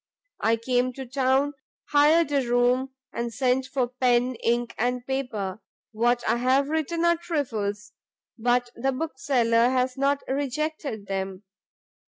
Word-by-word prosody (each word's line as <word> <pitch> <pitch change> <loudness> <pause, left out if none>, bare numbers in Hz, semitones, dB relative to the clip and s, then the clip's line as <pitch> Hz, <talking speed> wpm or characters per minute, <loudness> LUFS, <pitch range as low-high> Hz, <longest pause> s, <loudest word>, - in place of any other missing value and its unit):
I 225 +1 +3
came 250 +2 0
to 265 +1 -7
town, 265 +2 +1 0.4
hired 300 +2 +5
a 280 -2 +2
room, 250 +2 +2 0.2
and 235 0 -3
sent 255 +3 +1
for 255 -3 0
pen, 250 0 +2
ink 235 0 +1
and 245 +1 0
paper: 220 -8 -3 0.3
what 240 +2 +1
I - - +2
have 260 +3 +2
written 320 +2 0
are 340 0 +4
trifles, 220 - -3 0.4
but 245 +1 +1
the 265 +3 0
Bookseller 250 -5 +1
has 255 0 0
not 280 +1 +1
rejected 280 -4 -3
them. 195 0 -4
255 Hz, 135 wpm, -25 LUFS, 235-275 Hz, 0.4 s, hired